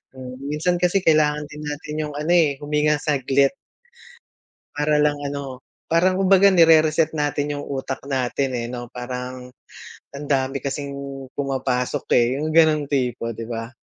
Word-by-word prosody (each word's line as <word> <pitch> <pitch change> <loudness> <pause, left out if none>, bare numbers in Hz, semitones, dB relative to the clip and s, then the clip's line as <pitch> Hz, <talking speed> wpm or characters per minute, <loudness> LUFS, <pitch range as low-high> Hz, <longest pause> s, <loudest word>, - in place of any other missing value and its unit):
Hmm, 125 -1 -8
minsan 150 +5 0
kasi 180 +2 +3
kailangan 150 -2 +3
din 150 - -9
natin 150 +1 -5
yung - - -9
ano, 155 +3 -1
eh, 160 -5 +4
huminga 150 +1 +2
saglit. 140 -2 +2 1.2
Para 150 +1 +1
lang 150 0 +2
ano, 140 -2 -6 0.3
parang 185 +3 +3
kumbaga 195 +1 +5
nire-reset 160 -2 +5
natin 145 0 -1
yung 145 - -5
utak 135 -1 -5
natin, 135 0 -1
eh, 115 - -3
'no? 120 -1 -7
Parang 125 0 -6 0.7
ang 145 +1 -7
dami 135 0 0
kasing 140 0 -4 0.4
pumapasok, 130 -3 -2
eh, 120 -1 +4
yung 155 - -2
ganong 155 -2 +4
tipo, 125 -4 -1
'di 115 - -5
ba? 115 -1 -5
145 Hz, 150 wpm, -22 LUFS, 130-155 Hz, 1.2 s, kumbaga